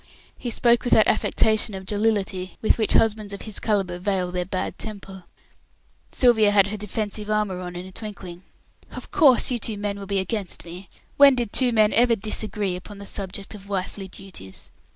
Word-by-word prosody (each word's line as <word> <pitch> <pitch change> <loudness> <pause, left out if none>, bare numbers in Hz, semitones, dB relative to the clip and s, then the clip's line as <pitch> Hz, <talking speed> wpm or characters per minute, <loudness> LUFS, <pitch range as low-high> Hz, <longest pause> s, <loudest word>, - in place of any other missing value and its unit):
He 245 - -4
spoke 235 +1 +3
with 245 - +1
that 215 - +6
affectation 215 -1 +2
of 190 0 -8
jollity 200 -3 -1
with 220 - +2
which 220 - +1
husbands 215 -2 +2
of 200 - -7
his 215 -2 -4
calibre 195 -5 -1
veil 185 -2 -1
their 180 0 -2
bad 185 0 -4
temper. 195 -4 -7 0.9
Sylvia 230 -5 +4
had 200 -1 +4
her 215 - -4
defensive 210 0 -4
armour 210 -3 0
on 180 -1 -7
in 175 +1 -6
a 190 - -11
twinkling. 185 -4 -8 0.5
"Of - - -10
course, 265 -4 +4
you 245 - 0
two 215 -1 0
men 200 0 -3
will 195 - -8
be 200 0 -1
against 190 -1 -3
me. 180 +3 -10 0.3
When 280 -1 +8
did 240 -4 -3
two 255 -2 +4
men 215 -2 +3
ever 235 0 +4
disagree 210 -2 -2
upon 195 +3 -10
the 200 - -9
subject 195 0 -5
of 200 -1 -12
wifely 195 0 -4
duties? 180 - -9
205 Hz, 190 wpm, -23 LUFS, 190-220 Hz, 0.9 s, When